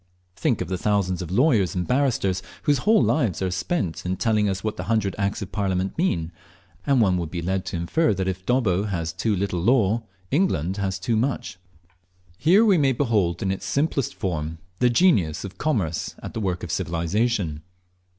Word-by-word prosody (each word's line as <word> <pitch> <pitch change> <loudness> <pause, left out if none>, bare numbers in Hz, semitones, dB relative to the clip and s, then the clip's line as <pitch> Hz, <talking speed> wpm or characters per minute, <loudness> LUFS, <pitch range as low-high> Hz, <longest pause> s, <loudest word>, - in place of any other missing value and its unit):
Think 125 -11 0
of 90 - -2
the 90 0 -3
thousands 95 -3 0
of 90 - -5
lawyers 105 - +2
and 90 -1 -1
barristers 120 -8 +1 0.2
whose 145 -2 +2
whole 215 - +4
lives 120 - +1
are 95 -1 -1
spent 95 - -2
in 90 +1 -2
telling 105 -1 +2
us 95 0 -3
what 110 -1 -2
the - - -5
hundred 110 -4 0
Acts 100 +1 -1
of 95 - -9
Parliament 95 -2 -1
mean, 85 - 0 0.6
and 135 -3 +4
one 95 -4 +3
would 85 -2 -3
be 85 - -4
led 95 +1 -1
to 90 - -3
infer 90 - +1
that 95 0 -2
if 95 0 -3
Dobbo 105 -5 +1
has 85 -5 -3
too 105 +5 0
little 95 -2 -1
law 115 0 +3 0.3
England 100 - +1
has 95 -1 -1
too 110 +5 -1
much. 110 -5 -2 0.8
Here 190 +9 +5
we 195 -6 +4
may 135 -2 +3
behold 105 -10 0
in 95 - 0
its 95 - -4
simplest 140 -3 0
form 80 -3 -3 0.2
the 125 - +4
genius 105 - +3
of 100 0 -8
Commerce 100 - -1
at - - -6
the 115 - -3
work 90 -3 -2
of - - -4
Civilization. 85 0 -1
100 Hz, 190 wpm, -24 LUFS, 90-125 Hz, 0.8 s, Here